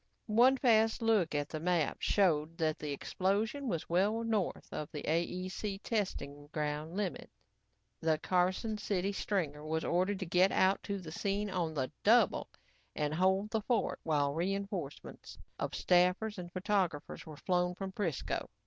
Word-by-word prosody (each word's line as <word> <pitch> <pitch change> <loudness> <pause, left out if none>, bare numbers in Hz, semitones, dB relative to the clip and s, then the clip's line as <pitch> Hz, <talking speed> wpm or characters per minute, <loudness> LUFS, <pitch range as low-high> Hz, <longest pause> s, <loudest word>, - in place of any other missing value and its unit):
One 245 +5 +5
fast 225 -3 +3
look 210 -9 +2
at 145 -1 0
the 155 - -4
map 170 -3 +1
showed 165 -5 +2
that 155 -2 0
the 150 -1 -4
explosion 205 - -1
was 170 -8 -2
well 205 +6 +2
north 220 -5 -1
of 150 - -4
the 150 - -6
AEC 185 +4 -2
testing 145 -10 -3
ground 150 +2 -3
limits. 200 -4 -3 0.7
The 160 -1 +2
Carson 185 +6 0
City 200 -2 -1
stringer 160 -8 -2
was 160 +1 -2
ordered 185 +4 +1
to 190 - -4
get 180 +3 +4
out 190 +1 +3
to 200 - -3
the 170 -5 -8
scene 200 +3 -1
on 170 -4 -1
the 130 -3 -1
double - - +4 0.5
and 150 0 -1
hold 190 +5 +2
the 220 - 0
fort 225 -1 0
while 145 -3 +1
reinforcements 190 -2 -4 0.2
of - - -2
staffers 180 +4 +2
and 175 -1 -7
photographers 185 -5 -1
were 155 -2 -9
flown 180 +1 0
from 195 0 -5
'Frisco. 180 -8 -2
180 Hz, 155 wpm, -33 LUFS, 160-205 Hz, 0.7 s, One